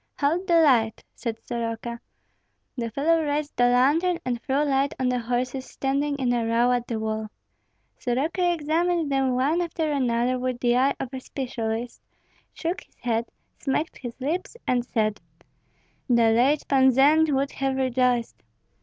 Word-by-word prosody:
"Hold 330 +6 +1
the 340 -2 +5
light," 230 -7 +3
said 230 -2 -4
Soroka. 235 0 -4 0.8
The 235 -3 -3
fellow 320 +8 +2
raised 295 -1 -2
the 245 - +3
lantern, 295 +9 +3
and 240 -2 -2
threw 275 +2 0
light 275 -1 +1
on 255 -1 +1
the 250 0 0
horses 250 +2 -2
standing 280 +2 -1
in 255 -3 0
a 240 -1 0
row 230 +2 +2
at 245 -1 0
the 230 - -2
wall. 220 0 -3 0.7
Soroka 315 +8 0
examined 330 0 0
them 265 -2 +1
one 290 +7 +1
after 325 -2 -2
another 250 -2 +1
with 255 -1 -2
the 240 -1 +2
eye 270 +3 +3
of 260 - -5
a 260 - -4
specialist, 240 -3 -4 0.5
shook 345 +2 -3
his - - -23
head, 235 -1 -1 0.3
smacked 300 +4 -2
his 240 -1 -8
lips, 330 - -3
and 245 -1 +1
said, 215 -4 -1 0.9
"The 235 -2 +4
late 265 +6 +2
Pan 265 -1 +5
Zend 300 +5 +4
would 275 +1 0
have 270 -1 -1
rejoiced. 250 -2 0
260 Hz, 160 wpm, -25 LUFS, 240-290 Hz, 0.9 s, the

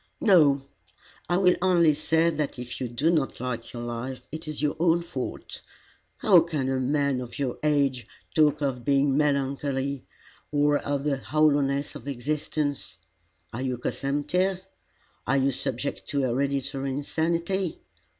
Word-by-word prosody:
"No. 155 - +5 0.7
I 175 - +3
will 180 -1 +4
only 175 -4 +4
say 160 +3 +2
that 150 -3 -3
if 125 +1 -7
you 125 - -1
do 130 +8 +1
not 155 -5 0
like 120 -2 -4
your 120 -1 -6
life, 120 +2 -5
it 160 +2 -7
is 155 -1 -5
your 150 +1 0
own 170 0 +3
fault. 170 - -6 0.6
How 190 -5 +6
can 155 -6 -2
a 135 -1 0
man 140 0 +1
of 120 -1 -8
your 135 -3 -2
age 140 -6 +1 0.3
talk 150 -1 +3
of 130 -4 -1
being 140 0 +2
melancholy, 140 -2 0 0.4
or 145 0 +3
of 140 -1 -2
the 145 -2 0
hollowness 145 -1 +1
of - - -10
existence? 145 - -2 0.6
Are 120 - -4
you 130 -2 -1
consumptive? 180 +10 -1 0.6
Are 135 +3 +3
you 135 0 +2
subject 130 +2 -3
to 140 - 0
hereditary 135 +2 -1
insanity? 170 +5 -1
140 Hz, 145 wpm, -26 LUFS, 135-155 Hz, 0.7 s, How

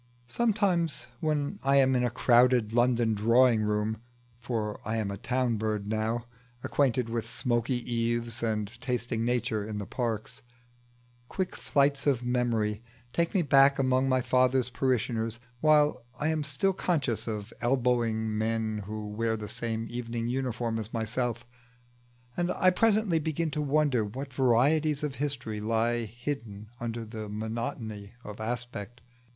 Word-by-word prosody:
Sometimes 195 - +1
when 150 -2 -1
I 135 0 +3
am 130 -1 +5
in 125 - +2
a 120 - +2
crowded 120 -1 +4
London 120 -1 +3
drawing 115 +2 +4
room 105 +1 -1 0.4
(for 110 -3 -3
I 110 +2 -2
am 105 -3 -1
a 100 - -5
town 125 -1 0
bird 105 -1 -2
now, 110 +2 -1 0.4
acquainted 125 -4 +1
with 115 0 -3
smoky 120 0 0
eaves, 120 0 -1
and 110 -2 0
tasting 125 -2 -1
Nature 120 -2 0
in 105 0 -5
the 100 - -4
parks) 115 +3 -3 0.9
quick 190 -1 -2
flights 140 0 +1
of 130 -4 +2
memory 115 -4 0 0.3
take 170 +2 0
me 185 - +3
back 140 -1 +5
among 130 0 +2
my 130 0 +3
father's 125 0 +2
parishioners 120 -3 0 0.2
while 150 -3 +4 0.2
I 150 - +1
am 160 -1 0
still 155 +7 +1
conscious 145 - -1
of 105 0 -4
elbowing 120 -3 +1
men 110 -1 -1
who 105 0 -5
wear 110 +2 -1
the 105 -1 -6
same 115 +1 -3
evening 120 -1 -4
uniform 120 -3 -1
as 110 0 -6
myself; 115 +1 -2 0.9
and 175 0 0
I 185 - +4
presently 210 -3 +3
begin 160 +1 -1
to 150 - -2
wonder 145 -4 +2
what 130 +6 -6
varieties 140 +4 +3
of 145 -3 -3
history 130 -7 -2
lie 115 +2 +1
hidden 110 -3 -6
under 115 -1 -4
this 110 -1 -7
monotony 110 -1 -4
of 105 0 -8
aspect. 120 0 -5
120 Hz, 145 wpm, -29 LUFS, 110-135 Hz, 0.9 s, am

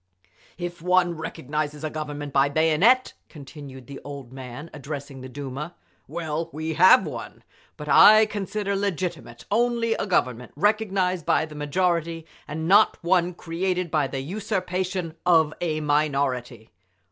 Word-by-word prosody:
"If 175 -1 -6
one 180 0 +2
recognises 150 -1 -4
a 155 - -3
Government 145 -2 -5
by 140 0 +4
bayonet," 165 - +3 0.2
continued 140 -3 -11
the 140 +2 -9
old 140 -3 -9
man, 130 +4 -9
addressing 140 -1 -7
the 130 - -8
Duma, 140 +5 -6 0.3
"well, 160 +1 -3
we 160 +1 -4
have 185 +3 +6
one; 125 -7 -8 0.3
but 150 - -8
I 215 +7 +8
consider 205 -1 -3
legitimate 175 -10 -3
only 235 +1 +2
a 210 - -3
Government 125 - 0
recognised 190 -2 +1
by - - +3
the 155 - -12
majority, 165 +2 -1 0.2
and 160 +2 -4
not 205 +4 +5
one 175 0 +2
created 180 +1 -2
by 150 -3 +2
the 135 0 -4
usurpation 185 -1 -3
of 160 -4 +4
a 155 -3 -1
minority!" 135 -6 -1
160 Hz, 135 wpm, -24 LUFS, 145-185 Hz, 0.3 s, I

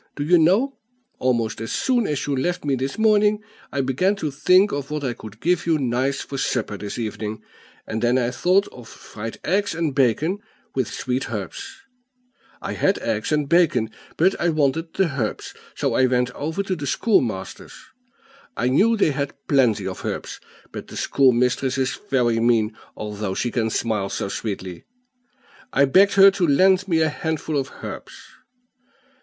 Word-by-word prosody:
Do 145 - -3
you 175 +3 +4
know, 205 - +3 0.4
almost 115 -4 0
as 115 - -4
soon 245 -4 +1
as 145 -3 -2
you 145 - -1
left 175 +5 -2
me 140 - +1
this 135 +1 -2
morning, 210 -1 +3 0.3
I 140 - 0
began 140 +10 +1
to 155 -7 -3
think 185 +8 +4
of 140 0 -4
what 150 -1 -3
I 125 -3 -1
could 110 -1 -12
give 175 +3 0
you 165 -2 +3
nice 130 +1 -1
for 135 - -6
supper 115 -6 -1
this 100 0 -6
evening, 110 -1 -4 0.4
and 110 0 -4
then 120 +1 +3
I 125 -1 0
thought 180 +10 +2
of 120 -3 -13
fried 110 +1 -8
eggs 200 +1 0
and 160 -4 -1
bacon, 145 - +1 0.3
with 130 -4 -1
sweet 125 0 -3
herbs; 100 -5 -6 0.8
I - - -3
had - - +1
eggs - - -2
and 150 -2 +1
bacon, 140 -9 +3 0.3
but 185 +4 +4
I 175 - +2
wanted 155 +1 0
the 155 -9 0
herbs; 110 - -3 0.2
so - - -1
I 130 - +4
went 125 -1 +1
over 160 +9 -3
to 190 -1 -2
the 145 -4 -5
schoolmaster's: 120 - -1 0.8
I 125 - +1
knew 220 - +3
they 165 - +3
had 140 0 -3
plenty 120 -8 +2
of 95 -1 -5
herbs, - - -5 0.3
but - - -8
the - - -9
schoolmistress 130 0 +2
is 130 -1 -1
very 120 -4 +2
mean, 115 -2 +2 0.2
although 105 -2 -4
she 120 - -1
can 115 -2 0
smile 110 -3 -1
so 100 - -3
sweetly. 95 -5 -5 0.9
I 140 - +4
begged 195 +9 +5
her 195 0 +8
to 190 -3 0
lend 185 +6 +4
me 165 -3 +2
a 160 - +3
handful 160 0 -3
of 135 -1 -1
herbs. - - -7
135 Hz, 175 wpm, -22 LUFS, 120-170 Hz, 0.9 s, her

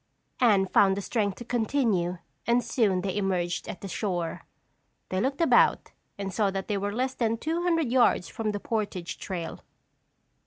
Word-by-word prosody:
Anne 210 -6 +5
found 190 +1 +4
the - - -2
strength 205 -4 0
to 240 - -9
continue 220 -7 0 0.3
and 240 +1 +3
soon 200 -7 +1
they 190 0 -2
emerged 185 -3 -1
at - - -7
the 195 - -5
shore. 175 -3 -3 0.6
They 185 0 0
looked 275 +5 -1
about 335 - +4 0.3
and 195 -1 -4
saw 210 -1 +2
that 195 0 -4
they 210 - 0
were 205 +1 -2
less 255 +4 -1
than 230 -3 0
two 320 +7 -2
hundred 330 -7 +1
yards 240 -8 +3
from 220 -2 -2
the 205 - -3
portage 200 -6 -3
trail. 175 -4 -5
205 Hz, 170 wpm, -27 LUFS, 190-240 Hz, 0.6 s, Anne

